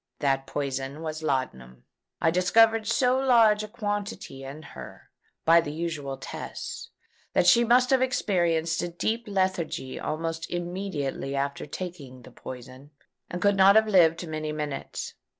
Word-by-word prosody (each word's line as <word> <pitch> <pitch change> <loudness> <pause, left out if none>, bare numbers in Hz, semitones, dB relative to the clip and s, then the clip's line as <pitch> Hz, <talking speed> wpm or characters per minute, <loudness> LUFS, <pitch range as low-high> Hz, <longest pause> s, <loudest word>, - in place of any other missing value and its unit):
That 135 -2 0
poison 135 +2 -4
was 155 0 -4
laudanum. 130 - -3 0.4
I 160 - +3
discovered 220 +5 +4
so 250 +2 +2
large 230 -5 +5
a 215 - -5
quantity 205 - -4
in 140 +4 -8
her, - - -11 0.3
by 170 +1 +7
the 145 - -5
usual 150 -4 -4
tests, - - -7 0.4
that - - +3
she 235 +6 +6
must 250 +2 +4
have 265 -1 +4
experienced 170 -10 +1
a - - -2
deep 220 +7 -2
lethargy 185 -9 -1
almost 165 +1 -3
immediately 175 -6 -3
after 140 +1 -2
taking 145 -8 -7
the - - -13
poison, 130 +2 -10 0.4
and 175 0 -4
could 205 0 +4
not 195 +1 +6
have 220 0 +5
lived 170 -4 +4
many 155 -1 -3
minutes. 150 -2 -5
165 Hz, 145 wpm, -27 LUFS, 140-205 Hz, 0.4 s, by